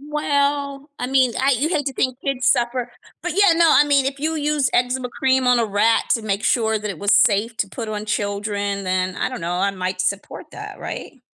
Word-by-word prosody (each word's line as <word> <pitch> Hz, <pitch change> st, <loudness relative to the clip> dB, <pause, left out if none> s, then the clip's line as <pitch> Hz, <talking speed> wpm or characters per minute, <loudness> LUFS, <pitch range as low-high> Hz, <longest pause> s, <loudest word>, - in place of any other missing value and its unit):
Well, 285 Hz, -1 st, -1 dB
I 250 Hz, -, -2 dB
mean, 260 Hz, -2 st, +2 dB
I 270 Hz, -, +3 dB
You 305 Hz, +4 st, 0 dB
hate 300 Hz, -5 st, -1 dB
to 270 Hz, -, -1 dB
think 255 Hz, 0 st, -1 dB
kids 260 Hz, -2 st, -1 dB
suffer. 240 Hz, 0 st, +1 dB, 0.3 s
But -, -, -2 dB
yeah, 400 Hz, -3 st, +5 dB
no, 335 Hz, 0 st, +4 dB
I 295 Hz, -, +6 dB
mean, 280 Hz, -2 st, +2 dB
if 275 Hz, 0 st, -4 dB
you 320 Hz, +1 st, -1 dB
use 295 Hz, -2 st, 0 dB
eczema 250 Hz, +1 st, 0 dB
cream 260 Hz, 0 st, +1 dB
on 250 Hz, -1 st, +4 dB
a 230 Hz, -, +2 dB
rat 210 Hz, +2 st, +2 dB
to 230 Hz, -, +2 dB
make 205 Hz, -1 st, -2 dB
sure 220 Hz, -2 st, +1 dB
that 210 Hz, -, -5 dB
it 195 Hz, -6 st, -5 dB
was 200 Hz, 0 st, +1 dB
safe 215 Hz, +3 st, +3 dB
to 200 Hz, -, -1 dB
put 225 Hz, +2 st, -6 dB
on 210 Hz, -1 st, -4 dB
children, 205 Hz, -1 st, -2 dB
then 185 Hz, 0 st, -1 dB
I -, -, -1 dB
don't 255 Hz, -, -7 dB
know, 170 Hz, +1 st, -3 dB
I 200 Hz, +2 st, +1 dB
might 185 Hz, -1 st, -3 dB
support 200 Hz, +2 st, -3 dB
that, -, -, -9 dB
right? 270 Hz, -, -7 dB
245 Hz, 230 wpm, -21 LUFS, 205-275 Hz, 0.3 s, I